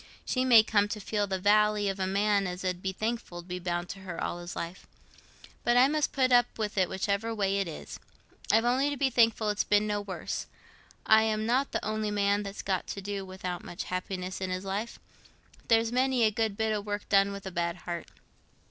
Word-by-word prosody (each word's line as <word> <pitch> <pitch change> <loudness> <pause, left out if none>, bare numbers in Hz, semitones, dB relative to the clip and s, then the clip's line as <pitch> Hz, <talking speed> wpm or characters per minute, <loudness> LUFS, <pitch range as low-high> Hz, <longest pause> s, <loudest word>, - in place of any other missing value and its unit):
She 255 - 0
may 235 -4 +8
come 205 -2 +2
to 210 +1 -4
feel 205 0 -1
the 190 -1 -1
vally 210 +1 +3
of 195 0 -2
a 190 - 0
man 200 0 +2
as 180 +1 -5
'ud 180 -1 -1
be 190 - -2
thankful 215 -4 -4
to - - -20
be 180 0 -4
bound 175 0 -2
to 195 - -7
her 185 -3 -7
all 175 - -3
his 175 0 -7
life. 170 +2 -6 0.8
But 240 0 +3
I 255 +2 +7
must 300 0 0
put 260 -2 +2
up 245 -1 +4
with 215 -2 -2
it 185 -3 +2
whichever 200 +4 -1
way 200 -1 +1
it 195 - -1
is—I've 220 +7 -3
only 260 +4 +2
to 285 - -3
be 270 -1 +1
thankful 225 -2 +3
it's 205 - 0
been 210 0 +3
no 205 -1 -1
worse. 200 -2 -5 0.6
I 220 0 +6
am 215 0 0
not 255 +4 +1
th' - - -8
only 215 0 -1
man 205 0 +1
that's 200 0 -6
got 190 -2 -1
to 200 - -5
do 200 0 -3
without 185 -2 -6
much 175 - -6
happiness 185 0 -4
i' 190 - -1
this 185 0 -3
life. 200 +4 -4 0.7
There's 225 0 +3
many 255 0 +2
a 215 - +4
good 215 -1 -1
bit 220 0 +1
o' 210 - -1
work 205 0 -4
done 200 0 +4
with 200 -1 -8
a 190 - -5
bad 170 -1 -1
heart. 175 -1 -4
205 Hz, 220 wpm, -29 LUFS, 190-220 Hz, 0.8 s, may